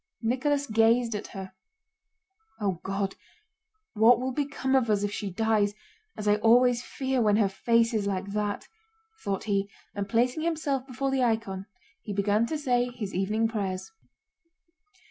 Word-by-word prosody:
Nicholas 280 +5 +1
gazed 230 0 +3
at 210 0 -4
her. 190 -1 -8 1.1
"O 195 -5 -1
God! 195 0 -2 0.8
What 225 +2 +6
will 260 +1 -2
become 275 -1 -2
of 250 -4 +2
us 205 -1 +2
if 205 - -1
she 205 -1 -4
dies, 210 +1 +1 0.4
as 210 - -4
I 205 0 +4
always 240 +2 +4
fear 265 -1 -2
when 210 -2 +4
her 210 -2 +4
face 230 +4 +2
is 210 -2 0
like 195 -1 -1
that?" 205 0 -2 0.6
thought 195 -1 -2
he, 200 -2 0 0.2
and 200 -1 -4
placing 245 +6 +1
himself 300 -5 -1
before 270 +1 -2
the 265 -1 +1
icon 220 -5 -1 0.3
he 205 - -5
began 205 +3 +2
to 315 - -2
say 250 -4 +1
his 230 -5 -6
evening 210 +5 +1
prayers. 200 - -3
225 Hz, 155 wpm, -28 LUFS, 205-250 Hz, 1.1 s, What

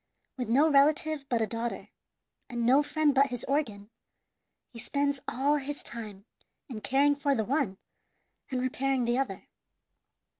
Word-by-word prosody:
With 250 -4 -4
no 280 +7 +5
relative 295 0 +2
but 235 -2 +1
a - - +2
daughter, 230 +2 -4 0.6
and 240 -2 -2
no 265 +4 +5
friend 295 0 +1
but 275 +1 +4
his 245 -2 -4
organ, 225 -7 -2 0.8
he 230 - -9
spends 280 +2 -1
all 285 +4 +1
his 285 +1 -5
time 210 -4 -7 0.4
in 230 -5 -7
caring 285 +4 +3
for 280 -1 +1
the 220 -3 -1
one 265 -7 0 0.7
and 255 - -2
repairing 260 0 0
the 240 +2 +1
other. 225 -9 -4
270 Hz, 150 wpm, -29 LUFS, 235-285 Hz, 0.8 s, no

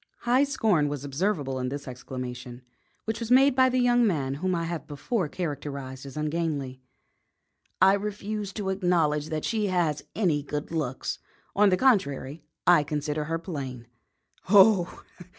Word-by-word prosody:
High 250 +4 +3
scorn 210 - +1
was 145 -1 -5
observable 145 -3 -1
in 125 0 -2
this 140 +1 -6
exclamation, 125 -1 -7 0.4
which 220 +1 -2
was 230 -1 -5
made 265 +2 +5
by 260 0 +5
the 255 - 0
young 245 -1 +4
man 140 -8 -1
whom 185 -1 +1
I 170 - -1
have 165 -1 -4
before 160 - -2
characterised 140 -5 -5
as 135 - -9
ungainly. 150 -4 -2 1.0
"I 190 +1 +6
refuse 205 0 -3
to 200 -2 -3
acknowledge 165 -6 +1
that 155 -1 -3
she 215 -3 0
has 175 -5 0
any 170 -9 +1
good 145 +2 -5
looks. 150 -6 -3 0.4
On 205 0 +5
the 185 - +2
contrary, 155 - +1 0.2
I 175 -3 +6
consider 150 +1 -2
her 165 +2 -1
plain." 140 -8 -6 0.6
"Oh! 195 -3 +5
165 Hz, 150 wpm, -27 LUFS, 140-205 Hz, 1.0 s, I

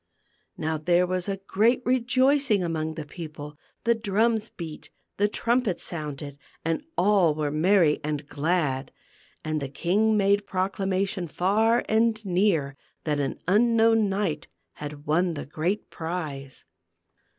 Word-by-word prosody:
Now 155 0 -2
there 175 +3 +3
was 185 +1 -2 0.2
great 230 +6 +2
rejoicing 255 -2 +3
among 160 -2 -2
the 155 -2 -5
peo 160 +3 -7
ple; 150 -1 -10 0.3
the 235 - +4
drums 220 0 0
beat, 160 -3 -8 0.3
the 205 - +3
trumpets 230 -2 0
sounded, 145 -3 -5 0.3
and 165 - -1
all 185 -5 +4
were 150 -1 -1
merry 165 0 +3
and 150 -1 -3
glad. 145 -4 -1 0.5
And 155 -1 -1
the 140 - -4
king 210 +9 +1
made 200 0 +2
proclamation 190 0 -1
far 215 +8 +2
and 220 0 +1
near 175 -7 +1 0.3
that 150 -2 0
an 140 - -2
unknown 225 +1 +4
knight 190 -6 -2 0.3
had 145 0 -8
won 170 +3 +1
the 145 - -5
great 165 +8 -2
prize. 155 -5 -5
180 Hz, 130 wpm, -26 LUFS, 155-210 Hz, 0.5 s, the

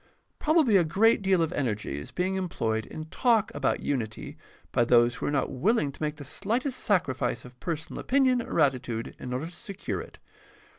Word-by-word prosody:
Probably 300 -9 +4
a 180 - +4
great 205 +8 +3
deal 190 -3 +3
of 165 +2 -2
energy 110 - -2
is 70 - -9
being 185 +1 -1
employed 115 - -1
in 155 - -7
talk 225 +5 +2
about 135 -2 0
unity 115 -6 -3 0.4
by 120 - +3
those 120 0 +4
who - - -4
are - - +1
not 145 -1 0
willing 150 - +1
to - - -16
make 150 0 -1
the 145 -2 -9
slightest 250 - -1
sacrifice 130 - 0
of 125 0 -14
personal 160 -2 -4
opinion 260 -2 +3
or 200 - -3
attitude 125 -5 0
in 125 - -6
order 130 +5 -2
to 170 - -8
secure 195 +2 -5
it. - - -12
155 Hz, 190 wpm, -28 LUFS, 125-200 Hz, 0.4 s, Probably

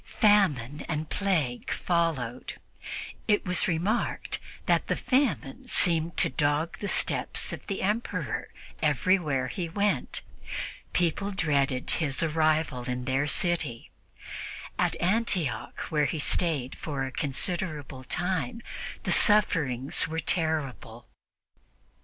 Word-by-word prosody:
Famine 150 - +2
and 155 -1 -3
plague 160 -12 0
followed, 130 -3 -1
and - - -17 0.7
it 210 -1 +3
was 180 -1 0
remarked 190 +7 -1 0.3
that - - +2
the - - +1
famine 250 - 0
seemed 165 -1 +2
to - - +4
dog 145 +4 0
the 205 - -3
steps - - +2
of - - -8
the 195 - -2
Emperor 210 +5 -1 0.3
wherever 150 -2 +2
he 170 +6 -4
went. 205 +4 0 0.7
People 180 +3 +1
dreaded 140 -8 +1
his 150 -2 +2
arrival 155 -5 +1
in 125 0 -3
their 135 +2 +1
city; 155 -7 0 0.9
at - - +1
Antioch, 180 - 0
where 150 -2 +3
he 145 - -1
stayed 150 -4 0
for 140 -4 -3
a 130 - -5
considerable 145 -1 -2
time, 185 - -2 0.4
the - - 0
sufferings 150 - +4
were 160 0 -3
terrible. 150 - -2
160 Hz, 115 wpm, -28 LUFS, 135-185 Hz, 0.9 s, to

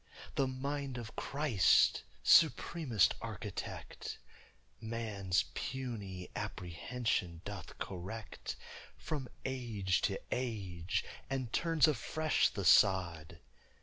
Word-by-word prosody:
The 135 - +2
mind 135 0 -3
of 115 -2 -7
Christ, 140 - +4 0.2
supremest 130 - +5
Architect, - - -6 0.6
Man's 110 -5 0
puny 105 -9 -4
apprehension 90 -1 -2
doth 100 -5 -7
correct 95 +4 -6 0.4
From 150 -5 -4 0.2
age 115 -8 0
to - - 0
age, 95 -9 -2 0.2
and 130 -4 -2
turns 165 -2 +4
afresh 155 +3 +2
the 100 - -4
sod. 85 -4 +4
115 Hz, 85 wpm, -34 LUFS, 95-130 Hz, 0.6 s, supremest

